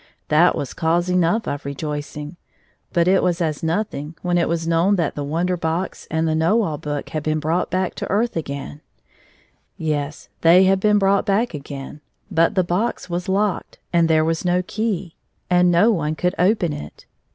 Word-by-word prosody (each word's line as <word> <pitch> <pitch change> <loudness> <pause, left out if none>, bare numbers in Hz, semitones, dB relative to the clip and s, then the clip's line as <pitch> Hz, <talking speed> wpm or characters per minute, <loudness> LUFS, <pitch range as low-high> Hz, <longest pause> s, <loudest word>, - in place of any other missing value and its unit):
That 165 +3 +4
was 140 - -4
cause 170 +2 0
enough 180 +5 +1
of 145 0 -3
rejoicing, 145 +2 -5 0.6
but 170 0 +2
it 190 +1 +4
was 175 -1 0
as 155 -4 -1
nothing 165 -3 -2
when 175 -1 +1
it 170 - +1
was 165 0 -1
known 170 +5 +3
that 170 -5 0
the 145 - -4
Wonder 170 +5 0
Box 170 +2 -3
and 160 +1 0
the 160 - +1
Kiiow 170 +8 +2
All 150 -4 -3
Book 145 -1 -4
had 155 -2 -3
been 155 +1 -1
brought 160 +4 0
back 185 0 -1
to - - -5
earth 225 +4 0
again, 145 -2 -5 1.0
Yes; 150 -2 -3
they 175 +3 +7
had 190 0 +3
been 210 +1 +3
brought 200 +1 +2
back 210 +3 +1
again, 140 0 -8 0.3
but 165 +1 +2
the 185 - +3
box 180 +2 -2
was 175 +2 -3
locked, 200 +1 -1 0.2
and 170 -1 +4
there 155 -1 +4
was 165 0 -1
no 180 0 +1
key, 200 -6 -2 0.4
and 180 0 +5
no 175 +7 +4
178 210 - +1
one 155 0 -1
could 180 +3 -1 0.2
open 175 -8 -1
it. 75 0 -9
170 Hz, 190 wpm, -21 LUFS, 155-185 Hz, 1.0 s, they